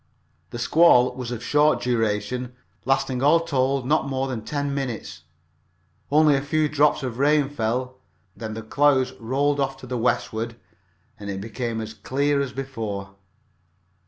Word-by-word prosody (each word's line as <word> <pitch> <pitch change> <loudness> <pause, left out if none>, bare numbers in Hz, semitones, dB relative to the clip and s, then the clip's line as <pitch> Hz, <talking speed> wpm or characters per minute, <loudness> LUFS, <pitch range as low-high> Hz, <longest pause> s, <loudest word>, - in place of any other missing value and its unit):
The 120 - -7
squall 125 0 +5
was 125 -2 -6
of 120 -1 -5
short 150 +3 +3
duration, 120 +1 -1 0.3
lasting 130 -1 0
all 150 +4 +5
told 135 -4 0
not 150 +1 +1
more 135 0 -1
than 120 -5 -4
ten 145 +2 -2
minutes. 125 - -4 0.9
Only 150 0 +5
a 135 - 0
few 155 +2 +1
drops 150 -1 +2
of 125 -2 -4
rain 145 0 +3
fell. 125 0 -2 0.4
Then 110 -2 -6
the 110 - -6
clouds 130 +2 +2
rolled 140 +5 0
off 135 -1 -1
to 135 - -11
the 125 -1 -3
westward 115 -1 -1 0.6
and 100 -1 -7
it 95 -1 -3
became 115 +2 -4
as 110 0 -6
clear 140 +5 0
as 135 -2 -3
before. 110 -8 -5
130 Hz, 155 wpm, -24 LUFS, 115-140 Hz, 0.9 s, squall